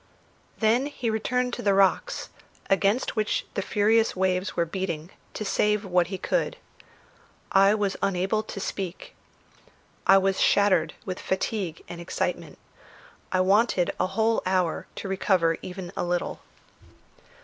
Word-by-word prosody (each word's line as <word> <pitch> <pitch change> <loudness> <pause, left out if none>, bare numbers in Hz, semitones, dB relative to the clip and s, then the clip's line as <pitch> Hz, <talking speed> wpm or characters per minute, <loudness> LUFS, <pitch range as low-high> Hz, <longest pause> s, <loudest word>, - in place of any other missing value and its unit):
Then 235 +5 +2
he 245 -6 -3
returned 250 +3 -1
to - - -3
the 200 -1 +2
rocks, 195 -1 +2 0.4
against 200 +5 +2
which 215 -1 0
the 200 - -1
furious 220 +3 +2
waves 185 0 0
were 170 - +1
beating, 170 -1 -4 0.2
to 215 - -4
save 210 +1 +1
what 180 -2 +2
he 190 +1 -4
could. - - -1 0.9
I 195 +2 +5
was 205 -2 -1
unable 195 +2 +1
to 215 - -7
speak. 190 -2 -5 0.9
I 195 - +8
was 195 0 +1
shattered 185 -6 +3
with 185 -1 -4
fatigue 190 -3 -2
and 170 0 -8
excitement; 170 - -3 0.7
I 185 - +2
wanted 195 -1 +3
a - - +2
whole 220 +4 +1
hour 185 -3 0
to - - -6
recover 185 -4 +2
even 180 -1 -7
a - - -1
little. 175 0 -2
195 Hz, 140 wpm, -26 LUFS, 185-210 Hz, 0.9 s, I